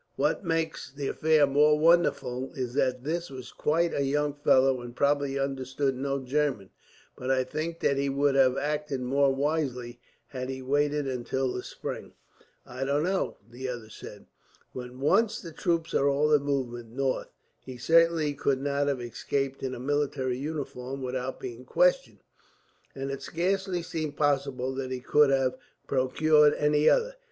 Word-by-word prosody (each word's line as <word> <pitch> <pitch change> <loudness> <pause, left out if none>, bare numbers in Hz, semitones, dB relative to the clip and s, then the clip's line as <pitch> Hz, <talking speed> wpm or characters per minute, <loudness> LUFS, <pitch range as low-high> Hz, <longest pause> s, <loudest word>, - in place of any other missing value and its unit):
What 150 +7 0
makes 160 -5 -2
the 140 0 -4
affair 155 -2 +3
more 150 +2 +4
wonderful 150 -6 +2
is 125 -2 -3
that 125 -1 0
this 170 +4 -2
was 130 -2 -9
quite 165 +2 +1
a 140 - 0
young 145 +1 0
fellow, 135 -2 +3
and 120 0 -9
probably 140 0 +1
understood 135 0 -1
no 135 +1 -2
German; 135 -6 -1 0.4
but 125 - -5
I 130 -1 +3
think 155 +5 -4
that 140 - +2
he 140 0 0
would 140 +1 +2
have 135 -1 +4
acted 150 -2 -2
more 135 +2 +2
wisely, 135 -4 -2 0.3
had 130 -1 -5
he 130 0 -5
waited 145 +2 +1
until 130 0 -2
the 125 - -3
spring." - - -7 0.5
"I 130 +2 -5
don't 140 +2 +1
know," 190 +2 -1
the 125 +3 -7
other 120 -3 -7
said. - - -11 0.5
"When 125 0 -8
once 200 +10 +2
the 165 - -9
troops 165 +1 -1
are 140 - +3
all 150 +2 +2
in 145 - +5
movement 125 -5 -3
north, 130 +2 -2 0.3
he 130 -1 -10
certainly 165 +2 +3
could 140 -1 0
not 140 +1 0
have 140 -3 0
escaped 135 +3 -3
in 130 -1 -3
a - - -8
military 135 -2 -1
uniform 135 -3 -5
without 130 0 -3
being 125 -1 -7
questioned; - - +1 0.7
and 135 0 -4
it 135 0 -5
scarcely 180 +4 -1
seems 155 -3 -4
possible 140 -3 0
that 130 -1 -4
he 130 -1 -3
could 150 +3 +4
have 135 -2 +1 0.3
procured 150 +3 +3
any 150 0 +3
other. - - +1
140 Hz, 165 wpm, -28 LUFS, 130-150 Hz, 0.7 s, in